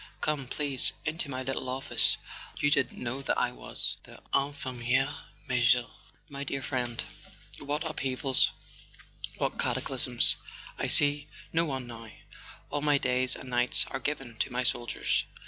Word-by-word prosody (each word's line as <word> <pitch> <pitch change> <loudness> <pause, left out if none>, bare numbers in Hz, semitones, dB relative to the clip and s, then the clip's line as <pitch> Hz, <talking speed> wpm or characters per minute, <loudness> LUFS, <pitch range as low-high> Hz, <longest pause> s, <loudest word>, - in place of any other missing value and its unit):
" - - -28
Come, 150 -4 0
please, 140 -1 0
into 160 -1 -2
my 130 -1 -3
little 130 0 -3
office: 130 +2 +2 0.4
you 145 - +2
didn't 140 -2 +2
know 125 +3 -3
that 135 - 0
I - - +1
was - - 0
the - - -14
Infirmiere 135 -1 0 0.3
Major? 125 0 +4 0.4
My 140 -2 -5
dear 135 -1 -3
friend, 120 -4 -2 0.6
what 145 +3 -2
upheavals, 135 -3 +1 0.9
what - - -2
cataclysms! - - +2 0.4
I - - 0
see 145 0 +4 0.3
no 165 +1 +3
one 135 -4 -3
now: 115 -2 -9 0.6
all 145 0 -1
my 145 -1 +4
days 130 0 +3
and 130 - -8
nights 120 0 +4
are - - -2
given 135 -5 -3
to - - -1
my 125 +1 0
soldiers." 120 -1 +1
135 Hz, 145 wpm, -29 LUFS, 125-145 Hz, 0.9 s, Major